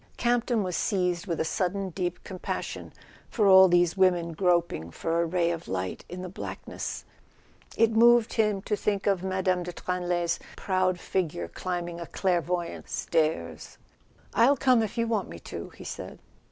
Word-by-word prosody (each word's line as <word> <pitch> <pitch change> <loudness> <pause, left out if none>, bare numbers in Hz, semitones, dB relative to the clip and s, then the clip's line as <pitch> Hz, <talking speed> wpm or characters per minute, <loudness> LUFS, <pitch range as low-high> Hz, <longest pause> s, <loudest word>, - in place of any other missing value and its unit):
Campton 240 -2 +1
was 180 -2 -3
seized 180 -2 0
with 170 -3 -2
a - - +1
sudden 190 +3 -1
deep 175 0 -3
compas¬ 185 -2 -4
sion - - -7 0.4
for 215 - +1
all 190 -1 +9
these 175 -1 +3
women 180 -3 +3
groping 170 - +1
for 165 - -1
a - - +1
ray 170 0 +1
of 170 0 -5
light 95 0 -3
in 180 +1 -6
the - - -4
blackness. 180 - -6 0.7
It 230 0 +4
moved 235 0 +5
him 210 -3 +1
to 210 - 0
think 200 -1 -1
of 195 -3 +2
Mme. 185 -1 0
de 175 0 -5
Tranlay's 175 -1 -1 0.2
proud 185 -1 0
figure 160 - -2
climbing 175 - -4
a 170 - -6
clairvoyantss 175 -2 -1
stairs. 120 - -1 0.6
"I'll 265 +5 +5
come 255 -2 +4
if 220 0 -3
you 230 - +2
want 220 -4 -1
me - - -8
to," - - -7
he - - -13
said. - - -7
180 Hz, 165 wpm, -27 LUFS, 170-200 Hz, 0.7 s, all